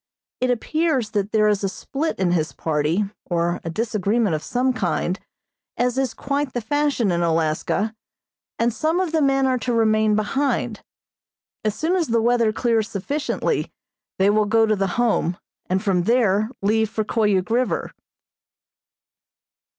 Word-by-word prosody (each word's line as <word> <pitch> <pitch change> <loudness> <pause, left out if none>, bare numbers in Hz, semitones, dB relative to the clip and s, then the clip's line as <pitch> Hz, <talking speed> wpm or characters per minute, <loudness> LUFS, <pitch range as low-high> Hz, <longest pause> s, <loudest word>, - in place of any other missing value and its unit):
It 255 - +1
appears 260 -1 0
that 205 0 -1
there 215 -1 +3
is 210 -1 +1
a 195 - +1
split 290 +10 -3
in 185 -2 +1
his 160 -3 0
party, 160 +5 0 0.3
or 175 0 0
a 165 - -4
disagreement 210 +1 0
of 155 - -1
some 255 +6 0
kind, 185 -2 -1 0.6
as 245 0 +1
is 265 -3 -1
quite 280 -1 -2
the 245 - -1
fashion 280 -3 +1
in 170 0 0
Alaska, 165 +6 0 0.6
and 235 0 +1
some 320 +7 0
of 370 -4 -1
the 320 -1 +1
men 270 -1 +3
are 255 -1 +1
to 245 - -2
remain 215 -2 +3
behind. 265 +7 -1 0.8
As 215 -1 0
soon 335 +4 0
as 345 -4 +1
the 230 0 +2
weather 235 -1 +3
clears 225 -1 0
sufficiently 280 +10 -2 0.5
they 195 +2 +4
will 215 0 +3
go 225 +2 +3
to 215 -1 +2
the 195 -1 0
Home, 220 -7 +1 0.3
and 190 +2 0
from 190 -4 +2
there 215 -3 +2
leave 220 +1 +2
for 220 - -1
Koyuk 210 -3 +1
River. 250 +2 0
220 Hz, 160 wpm, -22 LUFS, 195-255 Hz, 0.8 s, they